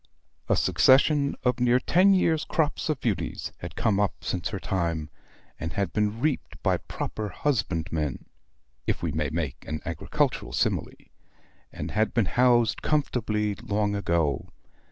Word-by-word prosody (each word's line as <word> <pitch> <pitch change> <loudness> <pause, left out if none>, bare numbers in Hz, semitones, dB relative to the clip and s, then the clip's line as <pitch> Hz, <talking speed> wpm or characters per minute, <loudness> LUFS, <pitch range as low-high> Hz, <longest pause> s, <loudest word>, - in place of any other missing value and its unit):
A - - +4
succession 140 +2 +4
of 125 -1 +1
near 125 0 +4
ten 190 +8 +4
years' 160 -4 +2
crops 160 0 0
of 150 -4 0
beauties 110 -6 -2
had - - -7
come 100 -3 +1
up 105 -2 +1
since 90 -1 -2
her 95 - -4
time, 85 -5 -2 0.5
and 80 0 -4
had 100 -2 -1
been 105 +1 0
reaped 150 +2 -1
by - - +3
proper 105 -1 -5
HUSBANDmen, 85 - -1 0.6
if - - -1
we 85 - 0
may 75 -1 -1
make 75 -4 -3
an 80 0 -3
agricultural 85 -2 -1
simile, - - +1 0.8
and - - -5
had 110 +1 0
been 115 -4 +3
housed 120 +1 +3
comfortably 110 -8 0
long 105 +1 -1
ago. 85 -7 0
105 Hz, 145 wpm, -26 LUFS, 85-125 Hz, 0.8 s, A